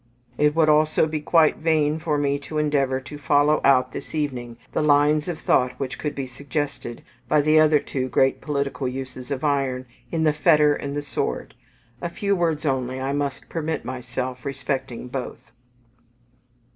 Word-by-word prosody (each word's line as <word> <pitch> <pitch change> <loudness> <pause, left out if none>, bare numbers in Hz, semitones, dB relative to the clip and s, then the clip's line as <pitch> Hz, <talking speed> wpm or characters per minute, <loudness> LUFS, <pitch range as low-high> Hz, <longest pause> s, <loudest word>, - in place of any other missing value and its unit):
It 150 +3 +2
would 160 -1 +4
also 155 +1 +4
be 155 -1 -3
quite 160 0 +4
vain 155 -1 +1
for 155 -2 0
me 140 -1 0
to 155 +2 -6
endeavour 140 -3 +1
to 145 +3 -10
follow 145 +1 +3
out 130 -2 +4
this - - -7
evening 125 -6 -3
the - - 0
lines 150 +1 +3
of 175 -3 -3
thought 125 0 +1
which 135 -2 -4
would 150 -1 -3
be 135 - -3
suggested 140 -1 -5 0.2
by 150 - +4
the 155 +2 +4
other 155 -1 +5
two 130 -2 -3
great 135 +2 +2
political 140 -2 -2
uses 130 0 -6
of 140 -1 -3
iron 135 -3 0 0.3
in 160 -1 0
the 155 -1 +3
Fetter 150 -1 +4
and 140 0 -4
the 145 - -2
Sword: 145 - -3 0.5
a 175 - -2
few 200 +3 0
words 165 -3 0
only 130 -2 -1
I 135 +1 -2
must 140 -1 -3
permit 160 -1 -3
myself 125 0 -4
respecting 135 -3 -4
both. 125 -2 -6
145 Hz, 170 wpm, -23 LUFS, 130-155 Hz, 0.5 s, other